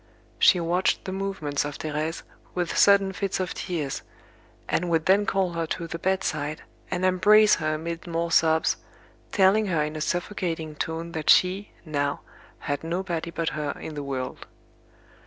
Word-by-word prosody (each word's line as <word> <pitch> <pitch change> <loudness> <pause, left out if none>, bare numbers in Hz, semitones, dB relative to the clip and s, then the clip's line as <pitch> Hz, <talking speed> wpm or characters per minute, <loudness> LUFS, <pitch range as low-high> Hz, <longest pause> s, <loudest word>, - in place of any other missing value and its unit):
She 180 - +6
watched 175 +2 +1
the 190 - -3
movements 190 -7 -2
of 145 0 -5
Thérèse 155 +1 -3 0.3
with 175 -2 -1
sudden 200 -1 +5
fits 195 0 -2
of 185 -2 -2
tears; 155 -6 -3 0.7
and 175 +1 0
would 165 -1 +1
then 200 +2 +4
call 190 -4 +1
her 165 -1 -2
to 170 - -3
the 165 0 -6
bedside, 160 -5 -1 0.3
and 185 - -1
embrace 210 +4 +6
her 155 -1 -1
amid 165 +2 -5
more 170 0 -2
sobs, 160 -1 +3 0.5
telling 205 +2 +4
her 165 -5 +1
in 150 +1 -4
a 155 - -4
suffocating 170 -2 -2
tone 160 +2 -4
that 160 -2 -3
she, 190 +3 +4
now, 145 -2 -1 0.4
had 145 +1 -3
nobody 170 0 -2
but 165 -1 -2
her 150 0 -3
in 160 - -7
the 145 - -4
world. 135 -2 -5
165 Hz, 160 wpm, -26 LUFS, 155-185 Hz, 0.7 s, She